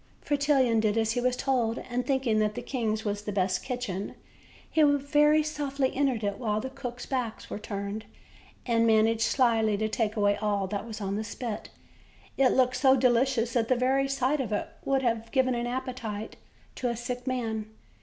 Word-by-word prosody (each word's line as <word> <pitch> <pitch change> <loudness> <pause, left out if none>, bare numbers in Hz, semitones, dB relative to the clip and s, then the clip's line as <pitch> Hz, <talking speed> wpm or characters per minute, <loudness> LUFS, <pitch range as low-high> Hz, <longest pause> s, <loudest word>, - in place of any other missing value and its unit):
Fretillon 275 -5 +2
did 215 0 +1
as 220 -1 +2
he 245 +1 0
was 250 0 +1
told, 250 -4 0
and, 245 0 -3
thinking 265 -6 +1
that 210 0 +1
the - - -5
king's 220 -4 -2
was 205 0 -2
the 210 - -4
best 185 -2 0
kitchen, 245 -7 -4 0.5
he 320 - +1
very 295 +1 +4
softly 285 -3 -2
entered 260 -5 +1
it 200 -1 -2
while 215 -4 0
the 260 +4 -5
cooks' 250 -2 -6
backs 250 -5 -3
were - - -4
turned, 205 0 -5 0.6
and 230 -1 +2
managed 225 0 +3
slyly 225 -3 +2
to 220 +1 0
take 220 -1 -1
away 205 -1 +3
all 205 -2 0
that 200 +3 -4
was 220 -1 -7
on 200 0 -2
the 215 - -2
spit; 220 +1 -5 0.7
it 270 - +4
looked 255 -1 +2
so 265 +1 +5
delicious 245 -1 +2
that 230 -2 +1
the 255 - +3
very 265 +2 +2
sight 275 +1 0
of 245 - -4
it 210 - -1
would 270 -1 +1
have 230 -2 0
given 260 -2 +2
an 240 0 -2
appetite 240 -4 -4 0.4
to 250 - -2
a 235 - -2
sick 245 +1 -5
man. 225 -4 -2
240 Hz, 190 wpm, -28 LUFS, 215-260 Hz, 0.7 s, so